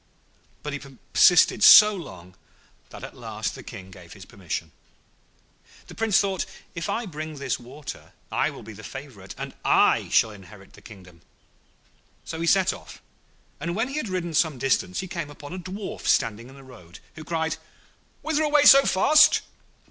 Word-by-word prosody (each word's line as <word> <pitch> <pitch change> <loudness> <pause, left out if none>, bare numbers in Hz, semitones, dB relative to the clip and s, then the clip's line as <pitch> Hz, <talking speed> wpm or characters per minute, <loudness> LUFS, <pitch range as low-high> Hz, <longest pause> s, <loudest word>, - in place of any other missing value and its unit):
But 150 - -5
he 145 - -4 0.3
persisted 180 +3 +5
so 210 0 +9
long 95 - -11 0.5
that - - -12
at - - -9
last - - -5
the - - -10
King 95 0 -11
gave 90 -3 -14
his 95 -3 -13
permission. 95 -8 -6 1.1
The - - -13
Prince 225 -3 +2
thought, 195 -3 -2 0.3
'If 170 0 -5
I 235 - -2
bring 155 -3 -7
this 135 -6 -3
water 135 +5 -10 0.2
I - - 0
shall - - -11
be 110 - -10
the 110 +2 -13
favourite, 125 -7 -10
and - - -7
I - - +3
shall 110 - +3
inherit 95 -1 -15
the - - -16
kingdom.' 90 -6 -15 1.0
So 160 - -6
he 170 - -2
set 190 +1 +3
off, - - -13 0.6
and 170 +4 -4
when 225 +5 -1
he 275 - -5
had 265 -9 -3
ridden 175 -3 -3
some 155 -3 +1
distance 160 +10 -1
he 190 - -7
came 170 -4 -5
upon 145 +2 -11
a 185 - -6
Dwarf 190 +3 -7
standing 115 +2 0
in 135 - -15
the 135 - -14
road, 100 -10 -15 0.2
who 155 - -10
cried, 160 0 -2 0.7
'Whither 315 -1 0
away 295 -1 +3
so 275 -1 +8
fast?' 305 +11 +5
155 Hz, 175 wpm, -24 LUFS, -, 1.1 s, so